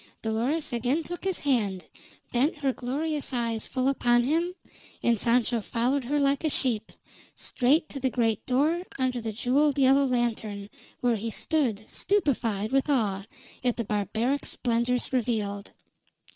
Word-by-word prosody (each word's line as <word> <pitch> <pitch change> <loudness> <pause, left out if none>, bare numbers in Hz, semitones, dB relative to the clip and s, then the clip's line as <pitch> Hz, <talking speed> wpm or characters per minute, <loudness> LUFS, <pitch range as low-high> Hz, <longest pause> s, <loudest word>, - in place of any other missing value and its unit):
Dolores 245 +8 -1
again 250 +7 0
took 350 +3 -7
his 380 -2 0
hand, 205 - 0 0.5
bent 260 +6 +2
her 275 -3 0
glorious 285 +4 -2
eyes 230 -2 -1
full 255 0 -1
upon 240 -3 +3
him, 335 +7 0 0.5
and 235 - +4
Sancho 235 0 +2
followed 245 +5 0
her 290 +4 0
like 280 +1 +2
a 315 - +2
sheep, 235 -6 +1 0.4
straight 290 +6 +1
to 275 - -6
the 260 0 +1
great 230 -3 0
door 300 +7 +2 0.2
under 255 -2 0
the 225 -1 -3
jeweled 270 +6 +2
yellow 275 +1 +5
lantern, 220 -5 -2 0.3
where 240 -2 +2
he 225 +3 -3
stood, 225 -4 -1
stupefied 230 - 0
with 270 +2 +2
awe 205 -7 +1 0.4
at 245 -2 +1
the 235 - -2
barbaric 220 +7 -1
splendors 245 +1 0
revealed. 210 -5 -1
250 Hz, 145 wpm, -27 LUFS, 225-280 Hz, 0.5 s, yellow